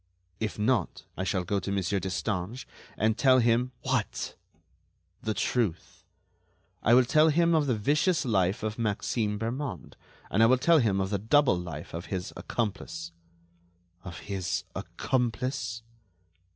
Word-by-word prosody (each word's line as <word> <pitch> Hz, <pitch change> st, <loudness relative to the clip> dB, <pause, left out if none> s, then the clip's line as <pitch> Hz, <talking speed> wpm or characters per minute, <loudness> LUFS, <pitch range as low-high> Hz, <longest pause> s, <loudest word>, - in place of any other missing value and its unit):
"If 110 Hz, -2 st, -3 dB
not, 110 Hz, +3 st, 0 dB
I 95 Hz, -, -3 dB
shall 95 Hz, -1 st, 0 dB
go 100 Hz, +3 st, 0 dB
to 100 Hz, -, -4 dB
Monsieur 100 Hz, 0 st, 0 dB
Destange, 95 Hz, +4 st, -3 dB, 0.3 s
and 110 Hz, +1 st, +2 dB
tell 130 Hz, -2 st, +6 dB
him——" 120 Hz, +1 st, +3 dB
"What?" 130 Hz, -5 st, -1 dB, 0.9 s
"The 110 Hz, -1 st, -2 dB
truth. 105 Hz, -10 st, -1 dB, 0.8 s
I 115 Hz, -, +5 dB
will 130 Hz, 0 st, +6 dB
tell 155 Hz, +5 st, +5 dB
him 170 Hz, +2 st, +3 dB
of 155 Hz, -3 st, +3 dB
the 125 Hz, -, +2 dB
vicious 150 Hz, -, +1 dB
life 95 Hz, -3 st, +1 dB
of 110 Hz, +1 st, -3 dB
Maxime 105 Hz, 0 st, -1 dB
Bermond, 115 Hz, -, -4 dB, 0.4 s
and 110 Hz, -, +2 dB
I 115 Hz, -, +7 dB
will 130 Hz, +2 st, +5 dB
tell 165 Hz, +5 st, +5 dB
him 105 Hz, -6 st, +2 dB
of 95 Hz, +1 st, -1 dB
the 100 Hz, -, 0 dB
double 130 Hz, +4 st, +4 dB
life 85 Hz, -4 st, -6 dB
of 85 Hz, +2 st, -5 dB
his 95 Hz, -1 st, -4 dB
accomplice." 100 Hz, -6 st, -4 dB, 0.9 s
"Of 90 Hz, -3 st, -8 dB
his 95 Hz, -4 st, -2 dB
accomplice?" 120 Hz, -2 st, -2 dB
110 Hz, 145 wpm, -28 LUFS, 95-130 Hz, 0.9 s, I